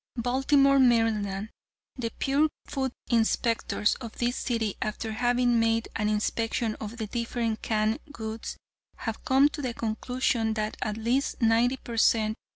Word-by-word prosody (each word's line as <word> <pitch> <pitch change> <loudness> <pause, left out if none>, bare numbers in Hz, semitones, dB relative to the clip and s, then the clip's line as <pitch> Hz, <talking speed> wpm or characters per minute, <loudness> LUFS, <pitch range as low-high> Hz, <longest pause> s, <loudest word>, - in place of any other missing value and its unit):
"Baltimore, 270 +3 +3
Md.: 220 -5 +2 0.5
The 235 -3 -3
pure 285 +3 +2 0.2
food 265 -3 -2 0.2
inspectors 230 -1 +2
of 230 -3 -8
this 245 +1 0
city 225 -5 -1
after 215 +1 -3
having 245 +1 +2
made 225 0 +1
an 210 -1 0
inspection 225 +1 0
of 220 +2 -6
the 220 - -3
different 230 0 -2
canned 215 +3 0
goods, 220 -4 -6 0.4
have 225 -2 -5
come 270 +2 +5
to 300 - -6
the 250 -4 -3
conclusion 225 0 -1
that 215 0 -2
at 215 0 -2
least 240 +5 0
ninety 235 +2 +3
per 235 -2 -7
cent. 220 -1 +3
230 Hz, 145 wpm, -27 LUFS, 220-250 Hz, 0.5 s, come